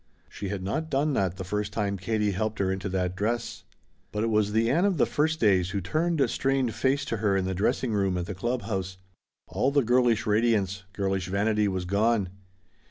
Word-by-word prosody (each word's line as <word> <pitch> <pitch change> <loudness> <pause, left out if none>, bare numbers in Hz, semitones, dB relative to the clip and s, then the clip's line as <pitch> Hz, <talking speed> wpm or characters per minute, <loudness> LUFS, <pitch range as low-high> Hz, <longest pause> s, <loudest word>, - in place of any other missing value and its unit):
She 100 - -6
had 100 -2 -4
not 155 +12 -2
done 145 +1 +1
that 95 -6 0
the 95 - -4
first 105 +2 -2
time 100 -1 -1
Katie 105 +2 0
helped 110 +2 -2
her 95 -1 0
into 95 +1 -3
that 90 -1 -1
dress. 115 +1 -2 0.5
But 105 +1 -2
it 115 - 0
was 105 -1 +2
the 110 +2 +2
Ann 160 +9 +2
of 200 -4 +2
the - - +4
first 155 +2 0
days 95 -5 +3
who 100 +1 -2
turned 155 - +1
strained 135 -1 0
face 135 +5 0
to 115 - -2
her 100 -2 +1
in 95 - 0
the 95 - -1
dressing 110 +5 0
room 95 -3 +1
at 90 - -2
the 100 - -5
club 120 +5 -2
house. 95 -3 -3 0.5
All 135 - 0
the 140 -1 +2
girlish 120 -2 +2
radiance 105 -3 +1
girlish 95 -1 -1
vanity 105 +2 +1
was 95 -2 -2
gone. 100 +1 +1
105 Hz, 210 wpm, -27 LUFS, 95-120 Hz, 0.5 s, the